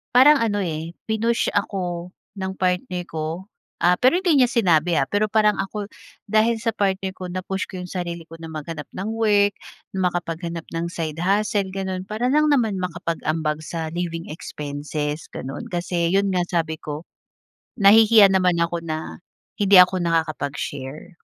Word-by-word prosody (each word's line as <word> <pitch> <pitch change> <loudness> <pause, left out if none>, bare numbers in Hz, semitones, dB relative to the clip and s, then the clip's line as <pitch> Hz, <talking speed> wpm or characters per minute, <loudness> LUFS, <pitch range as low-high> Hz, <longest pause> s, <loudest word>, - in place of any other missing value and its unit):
parang 285 +4 +8
ano, 205 -3 0
eh, 165 0 -4
pinush 225 +2 0
ako 180 -3 -2 0.3
ng 190 -1 -3
partner 180 -1 0
ko. 160 +4 -5 0.3
Ah, 175 +1 +4
pero 255 - +3
hindi 340 -7 +3
niya 245 - +2
sinabi, 175 - +3
ah, 135 - +2
pero 205 +5 +1
parang 215 -1 +4
ako 200 +1 -5 0.4
dahil 220 +2 +3
sa 230 0 -1
partner 190 -2 0
ko 185 -1 -7
na-push 185 +1 -3
ko 185 - -7
iyong 180 - -6
sarili 170 -2 -4
ko 165 - -11
na 165 - -6
maghanap 155 -1 -6
ng 195 +3 -4
work, 205 -2 +3 0.4
makapaghanap 170 -2 -2
ng 165 +1 -1
side 160 -2 -4
hustle, 200 +2 +1
ganoon. 190 -1 -3
Para 220 +4 -1
lang 305 +1 +4
naman 230 -8 +2
makapag-ambag 165 -3 -2
sa 160 0 -4
living 170 -1 -3
expenses, 150 0 -5
ganoon. 135 - -6
Kasi 175 -2 -1
iyon 200 +1 +3
nga 180 - +2
sabi 165 -3 0
ko 150 +2 -6 0.8
nahihiya 215 +1 +8
naman 180 -2 +3
ako 170 0 0
na 160 +1 -5 0.4
hindi 200 -1 +5
ako 180 0 +4
nakakapag-share. 155 -1 -3
180 Hz, 155 wpm, -23 LUFS, 165-205 Hz, 0.8 s, parang